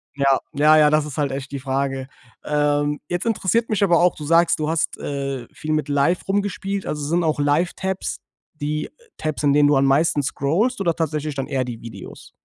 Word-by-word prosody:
Ja, 140 -1 +3
ja, 150 +2 +5
ja, 150 -1 +6
das 155 0 +2
ist 150 -1 -8
halt 145 -2 0
echt 135 0 -5
die 140 - -4
Frage. 135 0 -2 0.4
Ähm, 145 0 +1
jetzt 175 +3 -2
interessiert 230 +1 +1
mich 210 -2 0
aber 175 -3 +4
auch. 180 0 +3
Du 150 - -7
sagst, 165 +1 +3
du 155 0 -1
hast, 165 0 -1
äh, 135 -3 -4
viel 155 0 -5
mit 155 0 0
Live 145 +5 +1
rumgespielt. 200 0 -2
Also 150 -1 -3
sind 170 +3 +1
auch 155 -2 0
Live-Tabs 170 +6 -1 0.4
die 150 0 -3 0.3
Tabs, 155 -1 -3
in 145 -2 +3
denen 145 0 +5
du 145 - +4
am 135 0 +3
meisten 145 +2 +3
scrollst 180 - 0
oder 170 -4 +1
tatsächlich 155 -2 -2
dann 135 -1 -4
eher 130 -1 -1
die 120 -2 -7
Videos? 115 - -10
150 Hz, 205 wpm, -22 LUFS, 140-170 Hz, 0.4 s, ja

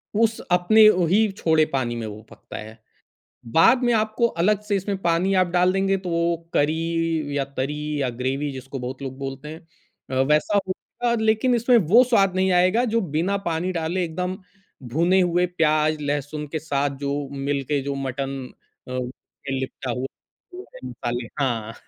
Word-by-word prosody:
उस 225 +1 +2
अपने 215 +5 +6
वही 190 +3 +3
छोड़े 160 -5 +2
पानी 120 -3 -1
में 115 -1 -4
वो 105 0 -8
पकता - - -10
है। 110 +1 -9 0.8
बाद 235 +10 +6
में 240 -1 +3
आपको 220 +2 +2
अलग 210 +3 +2
से 210 -1 -1
इसमें 195 +1 -2
पानी 175 +3 +1
आप 185 - +2
डाल 180 +1 +2
देंगे 195 0 +1
तो 185 -1 -6
वो 170 0 +1 0.2
करी 160 -1 0
या 140 - +1
तरी 140 +3 -1 0.2
या 130 - 0
ग्रेवी 135 +3 -1
जिसको 135 +1 -7
बहुत 130 +2 -6
लोग 130 -1 -6
बोलते 135 +1 -6
हैं। 160 - -8 0.5
अ, 130 0 +1
वैसा 155 +7 +2
होगा 235 +5 -3
लेक़िन 220 +3 +3
इसमें 240 +1 +4
वो 240 +4 +8
स्वाद 200 -7 +2
नहीं 190 0 +2
आएगा 185 +6 +3
जो 230 - +3 0.2
बिना 195 +4 +1
पानी 170 +3 -1
डाले 175 +1 -1
एकदम 180 +3 -3 0.6
भुने 175 +4 +3
हुए 175 0 +2
प्याज़, 155 -1 +2
लहसुन 145 +1 -3
के 155 +2 -4
साथ 140 -2 -1
जो 140 0 -1 0.3
मिल 140 -1 0
के 145 -2 +2
जो 140 +1 -3
मटन 135 +1 -3 0.5
अ, - - -8
में 130 +1 -5
लिपटा 130 -1 -4
हुआ 125 +2 -3 0.5
वो 370 +1 -8
हैं 130 - -8
मसालें 120 0 -4
हाँ। 115 -5 -1
160 Hz, 175 wpm, -23 LUFS, 135-190 Hz, 0.8 s, वो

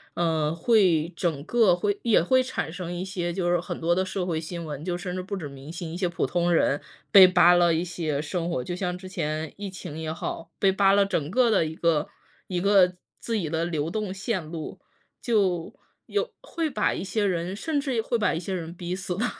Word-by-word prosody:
呃， 160 -3 +1
会 170 -3 +3
整 160 -6 -1
个 225 -3 +4
会 205 +3 -1
也 230 -3 +4
会 255 +9 +3
产 255 - -3
生 175 0 -5
一 175 +1 -4
些 175 -2 -3
就 175 0 -1
是 175 - +3
很 175 0 -6
多 170 +1 +2
的 185 - +1
社 185 -1 -3
会 170 -3 -1
新 170 +1 -6
闻， 150 -1 -6
就 175 0 -2
甚 180 0 -5
至 185 - -2
不 195 +2 -5
止 160 - -5
明 140 +2 -10
星， 170 -1 -6
一 - - -5
些 180 0 0
普 170 - -1
通 175 0 +1
人 145 -3 +2 0.3
被 195 -3 +10
扒 180 -1 +6
了 175 -1 +4
一 165 +2 0
些 160 -5 -2
生 170 +2 -3
活 130 - -1
就 175 +8 -4
像 180 -1 -2
之 185 +1 -10
前 155 -4 -3
疫 200 -1 -6
情 170 -5 -8
也 160 -1 -3
好， 165 +1 -5
被 195 - +4
扒 195 0 +4
了 200 0 +4
整 160 -6 -2
个 245 +2 +4
的 195 -6 +3
一 155 - -4
个 160 -2 +1 0.4
一 180 -2 -2
个 185 -1 +4 0.3
自 230 -2 -1
己 165 -6 -2
的 165 +1 -1
流 160 -2 -1
动 210 0 -3
线 190 -2 -2
路， 160 -2 -7 0.4
就 190 -8 +1 0.3
有 425 +4 -1
会 335 -10 -3
把 215 -7 +1
一 - - -4
些 205 +2 -1
人 180 -1 -1
甚 295 +7 -1
至 265 -5 -1
会 235 +2 -1
把 210 -4 +1
一 165 - -2
些 190 +2 -4
人 170 -2 -4
逼 175 0 -5
死 185 -1 -3
的。 220 +7 0
180 Hz, 250 characters per minute, -26 LUFS, 165-195 Hz, 0.4 s, 被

